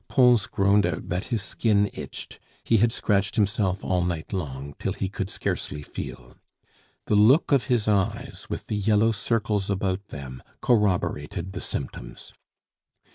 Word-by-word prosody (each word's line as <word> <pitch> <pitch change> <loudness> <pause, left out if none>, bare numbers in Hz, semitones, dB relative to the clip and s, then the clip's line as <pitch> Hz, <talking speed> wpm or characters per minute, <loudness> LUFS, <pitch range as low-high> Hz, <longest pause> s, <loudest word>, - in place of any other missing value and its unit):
Pons 125 -5 +4
groaned 100 +1 +3
out 85 -3 -4
that 90 +4 -1
his 115 -5 -1
skin 105 +1 +2
itched; - - -8 0.2
he 115 - +3
had 115 +2 +4
scratched 100 -3 0
himself 100 -2 +1
all 90 -1 +1
night 85 -1 -3
long, 70 -6 -4
till - - -1
he 95 - -2
could 100 0 -4
scarcely 75 - -3
feel. 60 -3 -8 0.7
The - - -1
look 110 +12 +5
of 135 -6 +4
his 115 -3 +1
eyes, 100 -3 -1
with - - -4
the - - -3
yellow 105 +2 +3
circles 105 -2 -1
about 100 0 -1
them, 65 -3 -8 0.2
corroborated 95 -5 0
the 95 - -6
symptoms. - - -6
100 Hz, 150 wpm, -25 LUFS, 90-110 Hz, 0.7 s, look